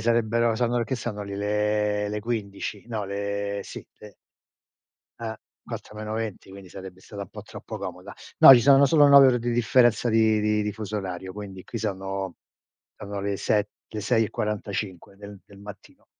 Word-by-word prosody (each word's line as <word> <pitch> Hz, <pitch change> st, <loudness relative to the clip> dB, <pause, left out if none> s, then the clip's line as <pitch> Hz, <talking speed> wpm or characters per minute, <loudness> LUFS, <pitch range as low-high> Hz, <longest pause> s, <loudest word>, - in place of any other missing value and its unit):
sarebbero 115 Hz, 0 st, +2 dB
sono 120 Hz, 0 st, 0 dB
che 130 Hz, -, -3 dB
sono 105 Hz, -4 st, -5 dB
lì? 100 Hz, 0 st, -6 dB
Le 105 Hz, 0 st, 0 dB
le 105 Hz, 0 st, -3 dB
15. 105 Hz, -2 st, -4 dB
No, 110 Hz, -3 st, -3 dB
le 100 Hz, 0 st, -3 dB
sì, -, -, -9 dB
le 105 Hz, -2 st, -13 dB, 1.0 s
Eh, 110 Hz, -1 st, -5 dB, 0.3 s
4 105 Hz, -, -8 dB
meno 110 Hz, 0 st, -5 dB
20, 110 Hz, -4 st, -5 dB
quindi 95 Hz, -1 st, -12 dB
sarebbe 95 Hz, 0 st, -10 dB
stato 100 Hz, +1 st, -8 dB
un 100 Hz, -, -9 dB
po' -, -, -9 dB
troppo -, -, -9 dB
comoda. -, -, -8 dB, 0.2 s
No, 135 Hz, -, +11 dB
ci 120 Hz, -, +5 dB
sono 140 Hz, +2 st, +6 dB
solo 145 Hz, +1 st, +5 dB
9 140 Hz, -1 st, +9 dB
ore 125 Hz, -2 st, +3 dB
di 120 Hz, +1 st, -2 dB
differenza 120 Hz, 0 st, +3 dB
di 110 Hz, -1 st, +3 dB
di 105 Hz, 0 st, +1 dB
di 105 Hz, -, -2 dB
fuso 105 Hz, 0 st, -5 dB
orario, 95 Hz, -1 st, -6 dB
quindi 95 Hz, -2 st, -9 dB
qui 115 Hz, -, -6 dB
sono 95 Hz, -2 st, -4 dB, 0.6 s
sono 100 Hz, 0 st, -6 dB
le 100 Hz, 0 st, -2 dB
se 105 Hz, -1 st, +1 dB, 0.2 s
le 110 Hz, -, -6 dB
6 115 Hz, +2 st, +2 dB
e -, -, -5 dB
45 100 Hz, -3 st, -4 dB
del 100 Hz, -1 st, -11 dB
del 100 Hz, -, -17 dB
mattino. 100 Hz, 0 st, -13 dB
105 Hz, 180 wpm, -25 LUFS, 100-115 Hz, 1.0 s, No